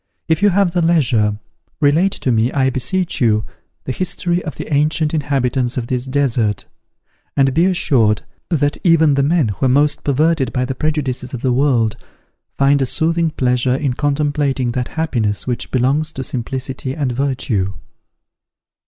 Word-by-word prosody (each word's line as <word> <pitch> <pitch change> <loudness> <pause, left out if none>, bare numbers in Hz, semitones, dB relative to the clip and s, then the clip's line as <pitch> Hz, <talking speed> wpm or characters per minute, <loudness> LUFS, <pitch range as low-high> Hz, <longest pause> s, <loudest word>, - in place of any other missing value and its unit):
If 160 +2 +1
you 205 - +5
have 190 -2 +1
leisure, 130 -12 +2 0.4
relate 160 +6 +3
to 130 - -1
me, 115 +2 +2
I 130 -1 +1
beseech 175 +8 -2
you, 110 -3 +2 0.4
the - - -4
history 175 +2 -2
of 155 -6 -6
the - - -6
ancient 150 +2 +1
inhabitants 135 -4 0
of 120 - -2
this 125 +1 -2
desert; 125 -7 0 0.7
and 135 -1 +3
be 165 +5 +3
assured, 125 - +2 0.3
that 145 -4 0
even 160 -4 +4
the 140 - +2
men 150 -3 +2
who 105 +7 -1
are - - +2
most 145 +3 +2
perverted 145 -2 +1
by 125 0 -1
the 130 - -3
prejudices 130 -3 -2
of 120 - -7
the 130 -2 +2
world, 125 -5 +1 0.6
find 140 +1 +3
a 135 - +1
soothing 165 +4 +1
pleasure 125 -3 0
in 135 -2 -1
contemplating 145 -2 0
that 125 0 -2
happiness 115 -10 -1
which 125 -2 -3
belongs 140 +5 +1
to 130 - -5
simplicity 130 +1 -4
and 140 -5 -1
virtue." 120 -7 -1
135 Hz, 160 wpm, -18 LUFS, 125-155 Hz, 0.7 s, you